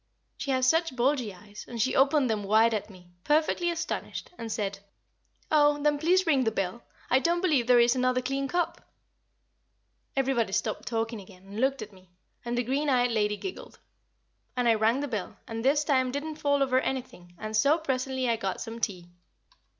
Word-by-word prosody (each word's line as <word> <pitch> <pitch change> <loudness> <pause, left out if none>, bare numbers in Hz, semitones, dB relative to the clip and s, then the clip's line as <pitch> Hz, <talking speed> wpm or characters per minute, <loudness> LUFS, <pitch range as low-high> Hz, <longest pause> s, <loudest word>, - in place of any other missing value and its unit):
She - - -6
has 260 -1 +2
such 325 -1 +2
bulgy 250 -3 +1
eyes, 205 +3 -12
and 235 - -7
she 260 +4 +1
opened 275 0 +4
them 215 -3 -1
wide 220 +3 +4
at 215 0 -3
me, 180 -3 -16
perfectly 315 +3 +2
astonished, 335 -2 -4
and 230 -6 -6
said, 200 -2 -3 0.7
"Oh! 295 -1 +4
then 295 -1 +2
please 360 +4 +3
ring 280 -6 +3
the 225 - +2
bell; 205 +2 -3 0.3
I 260 - +5
don't 340 +4 +1
believe 300 -10 +2
there 250 -1 +6
is 240 +1 +4
another 255 0 +2
clean 275 +1 -1
cup." 345 +2 -1 1.3
Everybody 255 -7 +1
stopped - - -2
talking 225 -1 -2
again, 185 -1 -16
and 200 +2 -7
looked 265 -3 +1
at 210 -1 -12
me, 185 -1 -19 0.3
and 240 0 -3
the 245 - +1
green 280 +5 0
eyed 245 -2 +3
lady 210 -2 +1
giggled 380 - -8 0.8
and 250 -1 +1
I 230 - +6
rang 225 +4 +2
the 290 - -2
bell, 215 -8 -4
and 225 0 -5
this 290 +3 +3
time 260 -3 +2
didn't 300 +3 -4
fall 285 -2 +2
over 260 -1 +2
anything, 245 -10 -5
and 215 +2 -5
so 280 +9 +4
presently 260 -4 -2
I 230 -1 +1
got 195 -3 -3
some 230 0 -6
tea. 180 -6 -3
255 Hz, 190 wpm, -28 LUFS, 220-285 Hz, 1.3 s, there